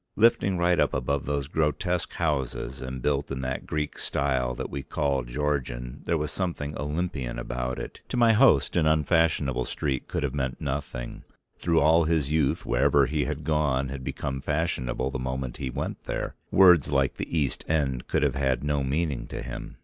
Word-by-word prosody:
Lifting 105 -4 +4
right 85 0 +3
up - - +2
above 65 +2 -1
those 70 -1 -1
grotesque 80 +3 0
houses 70 -4 -2
and 65 -1 -5
built 70 -1 0
in 65 -1 -3
that 65 0 -3
Greek 75 -1 -3
style 65 -3 0
that - - -5
we 70 - -3
call 70 -1 0
Georgian, 60 -2 -3
there 85 - +1
was 75 0 -2
something 85 -6 -3
Olympian 75 -5 -3
about 60 +1 -3
it. - - -7
To - - -2
my 115 -2 +6
host 105 - +4
an 80 -3 +3
unfashionable 80 -4 +2
street 65 -1 -2
could - - -2
have 70 -2 -1
meant 65 -3 -2
nothing, 70 -3 -4 0.4
through 85 -1 +2
all 80 +2 +5
his 80 -3 +1
youth 75 -3 +1
wherever 70 +3 +4
he 75 0 0
had 75 0 -4
gone 70 -3 +1
had 70 -1 -6
become 65 +1 -3
fashionable 70 -4 -1
the 65 - -3
moment 65 0 -3
he 65 -3 -3
went 65 - -4
there; - - -3 0.2
words 90 -7 +6
like 70 -2 +1
the 85 - -3
East 70 -4 0
End 70 -6 0
could - - +1
have 70 -3 +2
had 65 -1 0
no 75 -1 0
meaning 70 -3 -1
to - - -6
him. - - -7
70 Hz, 185 wpm, -27 LUFS, 65-80 Hz, 0.4 s, my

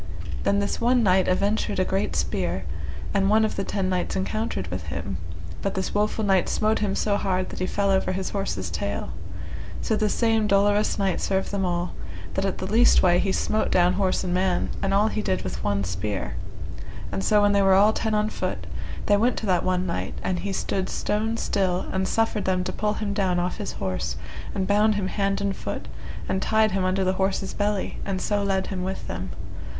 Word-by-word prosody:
Then 200 - +3
this 200 +2 -1
one 245 +1 +4
knight 190 -2 +4
aventred 200 +4 +1
a 185 - +2
great 195 +2 -1
spear, - - -1 0.5
and 195 -1 +3
one 220 +1 +5
of 215 - -2
the 195 - -1
ten 195 -1 -1
knights 185 -1 -1
encountered 190 - -1
with 90 +1 -5
him, - - -3 0.4
but 195 - -2
this 190 0 -2
woful 210 +1 +1
knight 190 -3 +3
smote 215 +1 +2
him 200 -2 0
so 205 -1 +1
hard 185 -2 0
that - - -7
he 185 - 0
fell 200 0 +1
over 190 -1 +2
his 185 0 -2
horse's 100 - -2
tail. 100 +5 -3 0.7
So 220 - 0
this 215 -1 +1
same 225 -2 +2
dolorous 205 +1 +3
knight 195 -3 0
served 190 0 0
them 200 -2 0
all, 175 0 -1 0.4
that 195 - 0
at 195 - -1
the - - -4
leastway 190 -4 +5
he 195 - +1
smote 215 +3 0
down 180 0 +4
horse 190 -1 +1
and 180 -1 -1
man, 185 -1 +1
and 195 - 0
all 200 +2 +4
he 215 - -1
did 190 -3 -1
with 95 - -4
one 100 -1 +1
spear; 90 -8 -3 0.8
and 195 - -2
so 210 -1 +4
when 205 - +5
they 200 0 +4
were 195 -1 +5
all 205 +3 +6
ten 220 -1 0
on 210 0 +2
foot, - - -3 0.4
they 205 - +4
went 235 +4 +2
to - - -3
that 185 -3 +2
one 185 0 +1
knight, 170 - -3
and 180 -2 0
he 200 - -3
stood 190 0 -1
stone 220 +2 -1
still, 185 -5 0
and 190 0 0
suffered 225 -2 +1
them 185 -1 +1
to - - -3
pull 210 0 0
him 210 -2 -2
down 190 -3 +1
off 180 0 -1
his 205 - -4
horse, 95 -1 -2 0.4
and 190 -1 0
bound 210 +2 +3
him 195 -2 -1
hand 195 0 0
and 200 -1 0
foot, - - -5 0.4
and 190 - 0
tied 220 0 +3
him 190 0 0
under 190 +1 +1
the 185 0 +2
horse's 195 0 0
belly, 205 -1 -1
and 195 -1 -2
so 205 +2 0
led 195 -1 +1
him 185 -2 -3
with 190 +1 -4
them. 90 +3 -4
195 Hz, 215 wpm, -25 LUFS, 185-210 Hz, 0.8 s, all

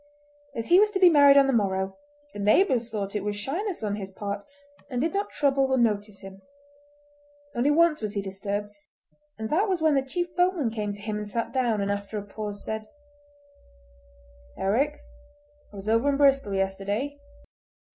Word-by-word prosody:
As 230 - -3
he 355 +2 +7
was 420 +1 +5
to 400 -2 -2
be 365 -2 +7
married 285 -2 +7
on 280 - +7
the 270 - +1
morrow, 190 -3 0 0.4
the - - -8
neighbours 240 - +3
thought 205 -2 -4
it 205 - -1
was 205 0 -2
shyness 335 - -3
on 205 -1 -1
his 195 -2 -6
part, 200 +1 -5 0.5
and 250 -3 -2
did 320 +8 0
not 400 +1 -1
trouble 275 -1 +2
or 265 - +2
notice 210 -4 0
him. 195 0 -11 1.1
Only 245 +4 +1
once 315 -1 +3
was 210 -1 -4
he 200 - 0
disturbed, 200 +1 -4 0.6
and 220 0 -5
that 390 +7 +2
was 370 -2 +1
when 315 -1 +3
the 275 - +3
chief 345 +6 -4
boatman 355 -9 +1
came 210 -2 -3
to 205 0 -9
him 210 0 -3
and 210 -1 -5
sat 230 +2 -3
down, 240 -5 +1
and 200 0 -1
after 200 +1 -4
a 205 - -4
pause 205 0 -7
said: 220 0 -4 1.7
"Eric, 270 +10 +1 0.7
I - - -14
was 195 +1 -8
over 230 +5 +3
in 280 - +1
Bristol 275 -7 +3
yesterday. 200 +9 -2
225 Hz, 185 wpm, -26 LUFS, 205-285 Hz, 1.7 s, he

